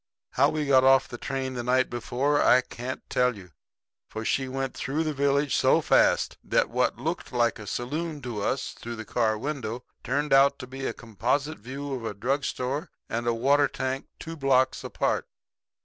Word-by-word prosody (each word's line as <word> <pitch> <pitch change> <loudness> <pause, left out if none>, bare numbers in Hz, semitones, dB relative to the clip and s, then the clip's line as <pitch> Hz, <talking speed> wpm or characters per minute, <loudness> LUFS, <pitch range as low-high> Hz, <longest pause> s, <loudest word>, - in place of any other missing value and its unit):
How - - +4
we 155 -1 -1
got 135 -2 +5
off 135 0 +5
the 120 - -8
train 130 -1 -3
there 125 - -3
the 125 - 0
night 130 0 +3
before 130 +4 0
I 125 - +6
can't 125 0 -7
tell 125 -3 +1
you; 90 -3 -13 0.6
for 110 0 -5
she 135 +3 0
went 135 0 -3
through 150 +4 -2
the 155 -1 -1
village 140 0 +1
so - - +4
fast - - +3
that - - +1
what - - +1
looked 160 +8 -4
like 120 -3 +1
a 105 - -9
saloon 150 - -3
to 120 -5 -4
us 135 +6 -1
through 120 0 -7
the 110 -1 -7
car 110 -2 +1
window 125 -2 -4 0.2
turned 145 +3 0
out 140 +1 +6
to 130 - -7
be 135 +1 -5
a - - -2
composite 125 - -2
view 135 +5 -6
of 125 -3 -4
a 110 -2 -4
drug 135 +7 -1
store 135 +4 -3 0.2
and 120 +1 -2
a 120 - +3
water 140 +5 +3
tank 130 +1 -3
two 165 0 -7
blocks 135 -3 +2
apart. - - -1
130 Hz, 195 wpm, -27 LUFS, 120-140 Hz, 0.6 s, I